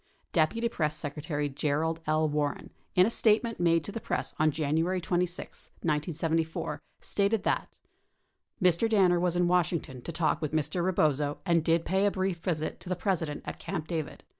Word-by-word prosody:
41 160 -2 +5
Deputy 230 +7 -2
Press 150 -7 -1
Secretary 150 0 -3
Gerald 150 +3 -1
L. 155 0 +3
Warren, 150 -1 -2 0.2
in 180 - +7
a 225 - 0
statement 225 +1 +2
made 165 -2 +3
to 205 - -5
the 230 - -5
press - - -2
on 155 0 +4
January 160 +5 0
26, 175 +1 -2
1974, 160 +1 -1 0.2
stated 200 +1 0
that: - - -1 0.8
Mr. 180 +3 +3
Danner 185 -5 +4
was 175 -1 +1
in 175 0 +3
Washington 170 -7 0
to 170 - -5
talk 160 0 +1
with 155 -1 -2
Mr. 155 +3 0
Rebozo 150 -5 +1
and 170 -3 +3
did 165 0 +2
pay 190 +2 +2
a - - +5
brief 190 -2 -1
visit 165 -3 -2
to 180 - -9
the 185 - +1
President 175 -5 -1
at - - -6
Camp 160 -5 -4
David. 160 -3 -4
165 Hz, 175 wpm, -29 LUFS, 155-185 Hz, 0.8 s, in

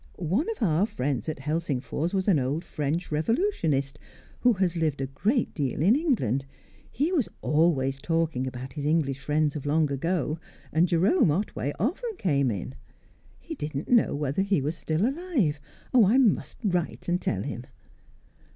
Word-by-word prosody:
One 190 - 0
of 445 - -3
our 180 +2 +3
friends 140 - -2
at 155 - -3
Helsingfors 150 +1 -2
was 190 0 -1
an 180 -8 +4
old 140 +7 -2
French 155 +3 -2
revolutionist, 155 - 0 0.4
who 245 -1 +4
has 185 -3 0
lived 155 -4 0
a 135 - -1
great 205 - 0
deal 140 -1 -1
in 205 +8 +5
England; 205 - +1 0.5
he 295 +8 0
was 305 - +1
always 140 -4 +2
talking 160 -4 0
about 130 0 -7
his 145 - -5
English 145 -3 +1
friends 150 +2 0
of 145 -1 -5
long 150 0 +2
ago, 160 +2 -1 0.3
and 165 +3 +4
Jerome 180 - +3
Otway 150 -3 -1
often 385 - -2
came 140 -7 +1
in. 110 +4 -4 0.7
He 330 - -7
didn't 150 - -5
know 240 -10 +4
whether 145 +4 -1
he 195 -3 +2
was 150 +4 -2
still 165 +5 0
alive. 270 - 0 0.3
Oh, 235 -6 +6
I 230 +6 +4
must 245 -7 +2
write 180 -5 -1
and 175 +1 +1
tell 95 -2 -1
him." 120 +3 -5
160 Hz, 165 wpm, -27 LUFS, 140-200 Hz, 0.7 s, Oh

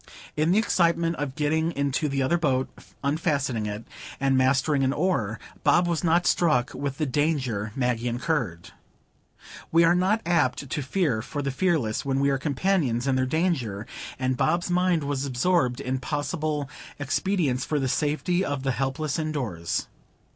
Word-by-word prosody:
In 155 +2 +1
the 185 - +4
excitement 170 -5 +2
of 140 -2 -3
getting 160 +3 0
into 140 +1 0
the 135 -1 0
other 170 +7 +2
boat, 130 -5 +1 0.4
unfastening 140 -6 0
it, 105 +2 -5 0.4
and 135 -1 +2
mastering 130 +2 +2
an 135 +1 +2
oar, 140 - 0 0.2
Bob 175 - +4
was 170 -1 -1
not 170 +1 +3
struck 150 -8 +2
with 140 -1 -4
the 155 - 0
danger 130 -7 0
Maggie 125 -2 0
incurred. 120 - -2 1.0
We 165 +1 +5
are 165 +1 +5
not 190 +5 +2
apt 160 -5 +1
to 150 - -1
fear 135 - 0
for 145 +4 -5
the 140 - -1
fearless, 135 -7 0
when 135 -1 0
we 140 0 +3
are 135 - 0
companions 140 -4 0
in 135 -1 +2
their 130 0 +1
danger, 130 - -1 0.3
and 130 0 0
Bob's 170 +7 +1
mind 180 -3 +2
was 140 -1 -2
absorbed 130 -1 +1
in 130 +1 -2
possible 150 +1 -2 0.3
expedients 145 -2 0
for 150 - -1
the 135 - 0
safety 155 +7 0
of 145 -6 -2
the 135 - +1
helpless 135 +4 -2
indoors. 125 - -2
140 Hz, 160 wpm, -26 LUFS, 130-165 Hz, 1.0 s, We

